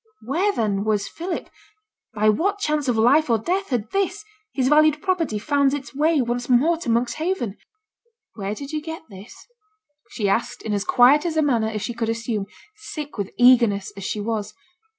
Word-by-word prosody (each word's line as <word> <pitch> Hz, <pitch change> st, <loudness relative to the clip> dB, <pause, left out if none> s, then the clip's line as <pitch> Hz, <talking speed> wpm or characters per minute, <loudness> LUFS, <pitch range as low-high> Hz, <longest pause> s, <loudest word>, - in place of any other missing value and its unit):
Where, 340 Hz, -, +1 dB
then, 205 Hz, -, -1 dB
was 210 Hz, -1 st, 0 dB
Philip? 345 Hz, +1 st, -5 dB, 0.6 s
by 215 Hz, -1 st, 0 dB
what 375 Hz, -, +1 dB
chance 300 Hz, -6 st, -1 dB
of 245 Hz, -3 st, +1 dB
life 270 Hz, +7 st, +4 dB
or 230 Hz, -, +4 dB
death 370 Hz, -, -2 dB
had 235 Hz, -5 st, -2 dB
this, 395 Hz, +2 st, -1 dB, 0.3 s
his 260 Hz, -2 st, 0 dB
valued 305 Hz, +1 st, +4 dB
property, 335 Hz, -, -1 dB
found 280 Hz, +4 st, +1 dB
its 285 Hz, -1 st, -8 dB
way 300 Hz, 0 st, +2 dB
once 245 Hz, +1 st, -3 dB
more 275 Hz, +8 st, +4 dB
to 320 Hz, -, -5 dB
Monkshaven? 245 Hz, -, -1 dB, 0.8 s
'Where 200 Hz, 0 st, -4 dB
did 280 Hz, +5 st, -8 dB
yo' 305 Hz, -, 0 dB
get 320 Hz, +1 st, -7 dB
this?' 195 Hz, +3 st, -13 dB, 0.6 s
she 210 Hz, -4 st, -2 dB
asked, 225 Hz, +4 st, -1 dB
in 215 Hz, -, -2 dB
as 200 Hz, -1 st, -1 dB
quiet 260 Hz, +4 st, +5 dB
a 320 Hz, -2 st, +1 dB
manner 235 Hz, -6 st, +1 dB
as 215 Hz, -2 st, -4 dB
she 240 Hz, -, -3 dB
could 230 Hz, -1 st, -2 dB
assume, 225 Hz, -3 st, -2 dB, 0.3 s
sick 300 Hz, -, -8 dB
with 200 Hz, -, -2 dB
eagerness 235 Hz, -6 st, +4 dB
as 195 Hz, -, -8 dB
she 210 Hz, -, -3 dB
was. 215 Hz, -1 st, -3 dB
250 Hz, 180 wpm, -22 LUFS, 220-310 Hz, 0.8 s, quiet